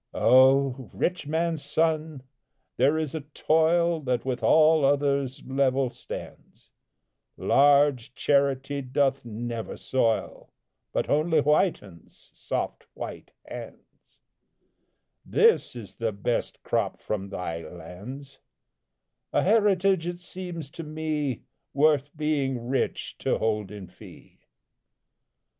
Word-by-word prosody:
Oh! 130 Hz, 0 st, +4 dB
rich 180 Hz, -5 st, -1 dB
man's 160 Hz, 0 st, -1 dB
son, 155 Hz, -1 st, -1 dB, 0.5 s
there 140 Hz, +5 st, +3 dB
is 155 Hz, -3 st, -2 dB
a 160 Hz, -, -3 dB
toil 160 Hz, +3 st, +2 dB
That 125 Hz, -4 st, -2 dB
with 130 Hz, -2 st, -2 dB
all 155 Hz, -1 st, +5 dB
others 140 Hz, -1 st, +1 dB
level 135 Hz, -1 st, +1 dB
stands; -, -, -10 dB, 0.7 s
Large 140 Hz, -2 st, +3 dB
charity 140 Hz, 0 st, +1 dB
doth 135 Hz, +1 st, 0 dB
never 115 Hz, 0 st, -5 dB
soil, 115 Hz, -4 st, -1 dB, 0.4 s
But -, -, -1 dB
only 155 Hz, +2 st, +2 dB
whitens, 145 Hz, -, -1 dB
soft -, -, -4 dB
white -, -, -7 dB, 0.2 s
hands; -, -, -11 dB, 1.1 s
This -, -, +3 dB
is 105 Hz, -6 st, -10 dB
the 115 Hz, -1 st, -1 dB
best 100 Hz, +4 st, -3 dB
crop -, -, -1 dB
from 100 Hz, -2 st, -4 dB
thy 85 Hz, -4 st, -4 dB
lands; 125 Hz, +12 st, -10 dB, 0.9 s
A -, -, +2 dB
heritage, 195 Hz, -4 st, +3 dB
it 175 Hz, 0 st, -3 dB
seems 175 Hz, -4 st, -7 dB
to 165 Hz, -, -7 dB
me, 150 Hz, -4 st, -3 dB, 0.3 s
Worth 145 Hz, -1 st, +3 dB
being 135 Hz, -6 st, -1 dB
rich 135 Hz, -, -2 dB
to -, -, 0 dB
hold 105 Hz, -3 st, -1 dB
in 105 Hz, -2 st, -8 dB
fee. 90 Hz, -, -16 dB
140 Hz, 110 wpm, -26 LUFS, 125-155 Hz, 1.1 s, all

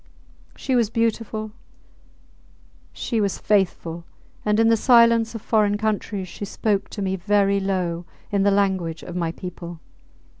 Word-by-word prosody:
She 260 Hz, -, -1 dB
was 235 Hz, -4 st, +2 dB
beautiful, 225 Hz, -1 st, -1 dB, 1.4 s
she 230 Hz, -3 st, -2 dB
was 200 Hz, -2 st, 0 dB
faithful, 175 Hz, -4 st, 0 dB, 0.4 s
and 210 Hz, 0 st, +2 dB
in 225 Hz, -, +5 dB
the 230 Hz, -, +5 dB
silence 230 Hz, -1 st, +4 dB
of 225 Hz, -, -6 dB
foreign 210 Hz, -2 st, +2 dB
countries 205 Hz, -2 st, -2 dB
she 180 Hz, -, -8 dB
spoke 205 Hz, 0 st, -1 dB
to 205 Hz, -, -5 dB
me 190 Hz, 0 st, 0 dB
very 200 Hz, +1 st, +2 dB
low 180 Hz, -3 st, -2 dB, 0.3 s
in 200 Hz, -1 st, +2 dB
the 200 Hz, -, +4 dB
language 190 Hz, -5 st, 0 dB
of 175 Hz, -, -8 dB
my 170 Hz, -2 st, -1 dB
people. 175 Hz, -1 st, -8 dB
205 Hz, 145 wpm, -23 LUFS, 185-220 Hz, 1.4 s, in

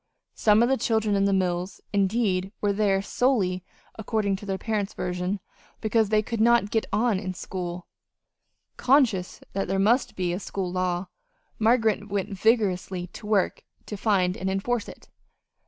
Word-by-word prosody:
Some 215 Hz, +1 st, +4 dB
of -, -, +3 dB
the 270 Hz, -, +3 dB
children 220 Hz, -2 st, +1 dB
in 195 Hz, 0 st, +2 dB
the 200 Hz, -, +2 dB
mills, 180 Hz, -1 st, -1 dB
indeed, 195 Hz, -2 st, +1 dB
were 205 Hz, -1 st, +1 dB
there 200 Hz, -2 st, +1 dB
solely 200 Hz, -7 st, +1 dB, 0.4 s
according 210 Hz, -2 st, 0 dB
to 205 Hz, -, -11 dB
the 195 Hz, -1 st, -1 dB
parents' 210 Hz, -2 st, -2 dB
version 180 Hz, +2 st, -2 dB, 0.4 s
because 220 Hz, -1 st, +1 dB
they 215 Hz, 0 st, +3 dB
could 230 Hz, 0 st, -3 dB
not 235 Hz, -3 st, +4 dB
"get 225 Hz, -, 0 dB
on" 215 Hz, -1 st, +2 dB
in 185 Hz, -2 st, -5 dB
school. 180 Hz, -1 st, -5 dB, 0.9 s
Conscious 245 Hz, -8 st, +2 dB
that 195 Hz, -, -1 dB
there 195 Hz, +1 st, 0 dB
must 225 Hz, +7 st, +2 dB
be 180 Hz, -2 st, -1 dB
a 180 Hz, -, -2 dB
school 190 Hz, -2 st, -4 dB
law, 180 Hz, 0 st, -1 dB, 0.5 s
Margaret 220 Hz, -2 st, +2 dB
went 200 Hz, +1 st, -2 dB
vigorously 190 Hz, -4 st, +1 dB
to 210 Hz, -, -9 dB
work 205 Hz, -3 st, +1 dB, 0.2 s
to 210 Hz, -, -6 dB
find 190 Hz, -3 st, +1 dB
and 190 Hz, -, -3 dB
enforce 210 Hz, +4 st, -1 dB
it. -, -, -13 dB
200 Hz, 160 wpm, -26 LUFS, 185-220 Hz, 0.9 s, Some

